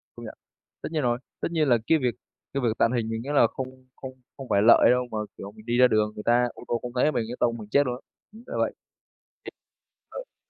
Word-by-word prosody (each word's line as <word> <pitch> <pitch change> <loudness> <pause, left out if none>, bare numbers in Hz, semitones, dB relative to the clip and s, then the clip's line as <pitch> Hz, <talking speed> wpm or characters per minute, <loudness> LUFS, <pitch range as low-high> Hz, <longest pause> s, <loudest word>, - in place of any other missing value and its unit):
Công - - -9
nhận, - - -9 0.5
tất - - -5
nhiên 155 -2 -1
rồi, 120 -1 +1 0.2
tất - - 0
nhiên 155 -3 +1
là 120 - +5
cái 160 - +5
việc 125 -3 0 0.4
cái 140 - -1
việc 120 - +2
tàng 115 - +3
hình 115 -3 -1
mình 115 0 -3
nghĩ 135 - -7
là 130 -5 +5
không 130 +1 -8
không 130 - -8 0.3
không 135 -2 -8
phải 100 - +3
lợi 115 +3 +6
đâu, 125 0 +1
mà, 110 - -3 0.2
kiểu, 100 - -8
mình 110 +1 -16
đi 120 +1 0
ra 125 0 +7
đường 110 -2 +1
người 105 - -7
ta 120 +1 +3
ô - - -12
tô 120 - -1
không 125 - -6
thấy 140 +5 +3
mình 115 - -1
cái 120 - -5
tông 120 -1 +1
mình 105 -2 -10
chết 140 +5 +3
luôn 125 - -2
á. 125 - -12 0.3
Ừm, 220 +2 -14
là - - -6
vậy, - - +1
thì - - -51 1.6
ờ - - -64
120 Hz, 270 wpm, -26 LUFS, 115-130 Hz, 1.6 s, ra